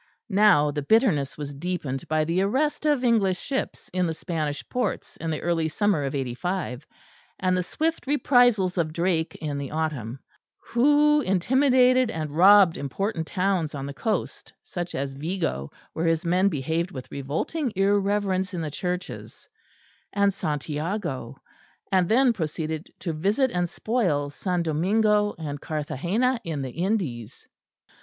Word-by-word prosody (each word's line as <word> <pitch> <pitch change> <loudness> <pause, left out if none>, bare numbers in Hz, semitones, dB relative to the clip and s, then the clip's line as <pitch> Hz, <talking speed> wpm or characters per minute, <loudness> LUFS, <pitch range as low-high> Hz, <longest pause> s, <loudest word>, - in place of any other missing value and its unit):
Now 190 -8 +5
the 145 0 -3
bitterness 160 - +2
was 145 -1 -5
deepened 140 -4 -4
by 155 0 +1
the 170 +4 +1
arrest 290 +10 0
of 290 -4 +2
English 210 -6 +3
ships 270 -1 -4
in 180 -1 +1
the 160 - -3
Spanish 155 -4 -3
ports 250 -5 -3
in 165 - -4
the 155 - -3
early 170 -2 +1
summer 185 -2 +1
of 135 - -3
'85, 135 +2 -3 0.5
and 185 -1 +1
the 180 - +1
swift 320 - -2
reprisals 245 -10 +3
of 155 -2 0
Drake 170 -1 0
in 145 -3 -4
the 140 -2 -5
autumn; 150 -7 -3 0.4
who 295 +4 +3
intimidated 255 +5 +3
and 155 -7 -4
robbed 190 0 +7
important 160 - -3
towns 185 -5 0
on 135 -1 -4
the 140 - -6
coast, 210 +7 -3
such 175 -1 -5
as 135 0 -3
Vigo, 140 - -3 0.2
where 165 +1 -1
his 165 +1 +1
men 185 +3 +3
behaved 160 +2 -1
with 130 -9 -9
revolting 160 - -2
irreverence 195 -1 +1
in 170 - -2
the 155 -2 -4
churches, 180 +4 -5 0.7
and 200 -1 +2
Santiago; 150 - -3 0.6
and 185 -3 +3
then 245 +1 +4
proceeded 160 -2 -4
to 170 -4 -2
visit 205 - +1
and 175 -1 -1
spoil 165 - -1
S. - - -10 0.2
Domingo 205 +6 +2
and 145 -3 -5
Carthagena 175 - -1
in 155 -4 -3
the 130 - -5
Indies. 165 - -3
175 Hz, 145 wpm, -25 LUFS, 150-205 Hz, 0.7 s, robbed